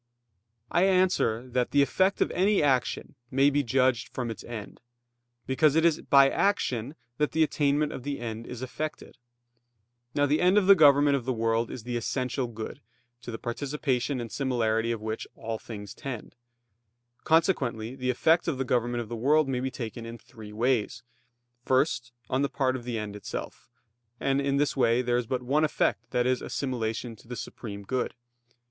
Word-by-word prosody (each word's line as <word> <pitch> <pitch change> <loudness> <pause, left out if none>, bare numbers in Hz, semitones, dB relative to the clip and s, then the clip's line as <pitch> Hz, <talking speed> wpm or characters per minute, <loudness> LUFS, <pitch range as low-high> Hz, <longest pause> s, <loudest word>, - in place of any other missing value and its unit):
I 175 - +4
answer 185 - +2
that, 125 0 0
The 140 0 +4
effect 190 +8 +1
of - - +2
any 195 -1 +2
action 135 -3 0 0.2
may 135 +2 +4
be 145 +1 +2
judged 130 -1 +1
from 120 -3 -4
its 105 - -8
end; 110 -4 -8 0.6
because 145 +3 +3
it 160 +1 +4
is 165 -2 +3
by 140 -1 +6
action 135 - 0 0.2
that 150 - +1
the 160 0 +4
attainment 145 0 +1
of - - -6
the 140 +2 -4
end 115 -1 -5
is 125 0 -7
effected. 150 0 -6 1.0
Now 145 - +3
the 145 +2 +1
end 180 +3 +4
of 205 - +4
the 200 - +9
government 145 -4 +5
of 125 - -6
the 130 - 0
world 115 0 0
is 120 - -7
the 120 0 -3
essential 125 +1 -2
good, 110 -1 -7 0.4
to 125 - -9
the 115 - -4
participation 130 +1 -2
and 115 -1 -6
similarity 115 -4 0
of 115 -2 -4
which 110 0 -4
all 115 -1 -5
things 105 -3 -8
tend. 130 -6 -7 0.9
Consequently 130 - +1
the 125 -1 -3
effect 160 +7 +3
of 155 -6 0
the 135 - -1
government 120 -1 0
of 115 - -7
the 120 - -5
world 145 +6 +3
may 130 -2 -1
be 130 +1 -2
taken 115 -2 -6
in 115 +1 -7
three 110 -1 -12
ways. 115 0 0 0.6
First, 130 -2 +1 0.2
on 130 - 0
the 140 - +1
part 130 -1 0
of 120 -2 -6
the 120 -2 -3
end 105 -2 -5
itself; 105 - -7 0.5
and 135 0 +1
in 140 0 +1
this 145 0 +1
way 125 -2 +3
there 120 0 +1
is 120 -2 -2
but 125 0 -2
one 145 +5 +2
effect, 155 - 0
that 120 0 +1
is, 130 -1 +1
assimilation 120 -3 -3
to 115 - -19
the 125 - -6
supreme 100 -4 -7
good. 125 +3 -2
130 Hz, 185 wpm, -28 LUFS, 115-145 Hz, 1.0 s, the